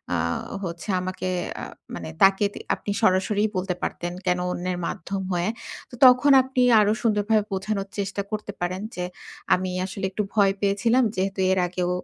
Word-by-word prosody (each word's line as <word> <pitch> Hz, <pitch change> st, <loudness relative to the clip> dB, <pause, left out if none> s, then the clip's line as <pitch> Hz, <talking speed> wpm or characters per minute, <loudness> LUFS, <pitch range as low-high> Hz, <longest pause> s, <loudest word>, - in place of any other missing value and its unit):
আ -, -, +1 dB, 0.5 s
হচ্ছে 170 Hz, +2 st, -6 dB
আমাকে 185 Hz, 0 st, -4 dB, 0.3 s
আ -, -, -6 dB, 0.3 s
মানে 80 Hz, -, -6 dB
তাকে 195 Hz, +1 st, +5 dB
তি -, -, -8 dB, 0.2 s
আপনি 205 Hz, -, -5 dB
সরাসরিই 200 Hz, +3 st, +2 dB
বলতে 185 Hz, -1 st, -1 dB
পারতেন। 175 Hz, 0 st, -3 dB
কেন 180 Hz, -1 st, +2 dB
অন্যের 180 Hz, 0 st, -3 dB
মাধ্যম 195 Hz, +3 st, -4 dB
হয়ে? 175 Hz, +3 st, 0 dB, 0.4 s
তো -, -, -10 dB
তখন 255 Hz, +3 st, +7 dB
আপনি 260 Hz, 0 st, -1 dB, 0.2 s
আরো 210 Hz, 0 st, +4 dB
সুন্দরভাবে 215 Hz, -1 st, +2 dB
বোঝানোর 195 Hz, +1 st, -2 dB
চেষ্টা 200 Hz, 0 st, -2 dB
করতে 210 Hz, -1 st, -4 dB
পারেন, 185 Hz, +2 st, -2 dB
যে, 180 Hz, -, -3 dB, 0.5 s
আমি 185 Hz, 0 st, 0 dB, 0.2 s
আসলে 195 Hz, 0 st, -4 dB
একটু 210 Hz, -, -1 dB
ভয় 200 Hz, -2 st, +4 dB
পেয়েছিলাম। 205 Hz, +6 st, +2 dB
যেহেতু 195 Hz, +1 st, -2 dB
এর 190 Hz, -, +2 dB
আগেও 180 Hz, 0 st, -2 dB
195 Hz, 165 wpm, -24 LUFS, 185-210 Hz, 0.5 s, তখন